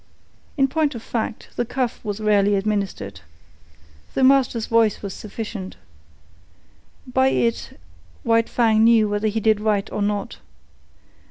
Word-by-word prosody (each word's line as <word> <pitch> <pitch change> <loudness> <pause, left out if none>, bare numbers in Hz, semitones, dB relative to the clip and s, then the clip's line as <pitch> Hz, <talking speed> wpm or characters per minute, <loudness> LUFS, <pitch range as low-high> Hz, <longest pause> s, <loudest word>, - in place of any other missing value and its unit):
In 270 -1 +4
point 300 0 0
of 230 - -7
fact, 225 -2 -4
the 240 - +1
cuff 245 0 -2
was 205 0 -4
rarely 205 -1 +3
administered. 195 - -2 1.0
The 265 - +1
master's 260 -4 +3
voice 225 -3 +2
was 195 -2 -4
sufficient. 210 -3 -7 1.3
By 260 +1 +2
it 235 -3 -1 0.5
White 230 -1 +2
Fang 220 -2 +3
knew 225 -2 +5
whether 205 +1 -1
he 215 +1 -1
did 220 -1 +2
right 210 -1 0
or 210 - -3
not. 205 0 -2
220 Hz, 135 wpm, -22 LUFS, 205-235 Hz, 1.3 s, knew